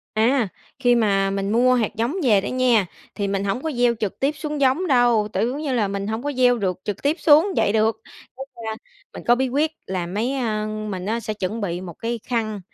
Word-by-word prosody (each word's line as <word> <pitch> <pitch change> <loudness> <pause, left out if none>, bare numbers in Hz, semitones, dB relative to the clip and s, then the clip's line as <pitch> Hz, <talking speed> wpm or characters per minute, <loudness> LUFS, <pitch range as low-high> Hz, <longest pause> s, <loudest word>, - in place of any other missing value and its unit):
À, 230 0 +2 0.3
khi 245 -2 +3
mà 195 -4 +2
mình 195 +1 -2
mua 255 +2 +4
hạt 225 -4 0
giống 235 +7 -1
về 210 -5 +5
đó 200 - -6
nha, 250 -6 +2 0.3
thì 200 -2 -2
mình 195 0 -1
hổng 200 +6 -2
có 320 - -2
gieo 240 -1 +2
trực 210 -3 -3
tiếp 275 +2 +2
xuống 300 -1 -4
giống 275 +8 +2
đâu, 240 -6 +3
tự 230 - +1
giống 275 - -4
như 285 -4 -2
là 220 -5 +1
mình 200 0 -3
hổng 220 +3 -3
có 290 0 -2
gieo 250 -2 +3
được 185 -3 -2
trực 205 -1 -4
tiếp 295 +4 +1
xuống 310 +4 +6
vậy 200 - +2
được. 220 0 +2 0.4
Cái 270 - -6 0.2
khan 220 - -3 0.4
mình - - -8
có 240 - +6
bí 260 +1 0
quyết 295 +5 +1 0.2
là 185 -2 -3
mấy, 220 +9 -2
ơ 215 -4 -1
mình 215 -3 -5
á 230 +2 -1
sẽ 215 -1 -4
chuẩn 210 +3 -3
bị 175 -3 -3
một 175 -3 -8
cái 230 0 -3
khăn 215 -4 -1
225 Hz, 240 wpm, -22 LUFS, 205-255 Hz, 0.4 s, xuống